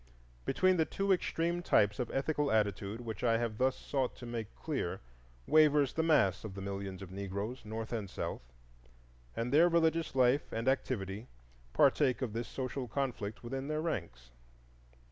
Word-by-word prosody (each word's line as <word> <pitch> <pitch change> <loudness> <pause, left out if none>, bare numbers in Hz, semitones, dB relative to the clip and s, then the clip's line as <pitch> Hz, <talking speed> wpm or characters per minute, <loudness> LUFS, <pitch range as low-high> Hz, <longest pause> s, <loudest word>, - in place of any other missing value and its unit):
Between 185 0 +3
the 160 - +3
two 195 +4 -1
extreme 170 -1 0
types 105 - +3
of 125 - -1
ethical 145 +1 0
attitude 105 0 0
which 110 -4 -6
I 115 -2 +4
have 115 -2 -2
thus 130 0 +2
sought 135 -3 -2
to 120 - -10
make 115 -3 -5
clear - - -3 0.5
wavers 150 -3 +5
the 160 - +1
mass 150 - +3
of 105 -3 -7
the 100 - -6
millions 100 -1 -5
of 90 - -10
Negroes, 100 +6 -4
North 110 +2 -5
and 105 -4 -3
South; - - -4 0.9
and 120 +3 -2
their 165 +4 +6
religious 165 -2 +2
life 130 +2 +3
and 115 +2 -3
activity 110 -5 -1 0.4
partake 135 - +3
of 115 -5 -3
this 115 0 -3
social 130 +1 -4
conflict 120 -3 -3
within 135 +3 -4
their 155 0 -1
ranks. 85 - -4
120 Hz, 165 wpm, -33 LUFS, 105-145 Hz, 0.9 s, their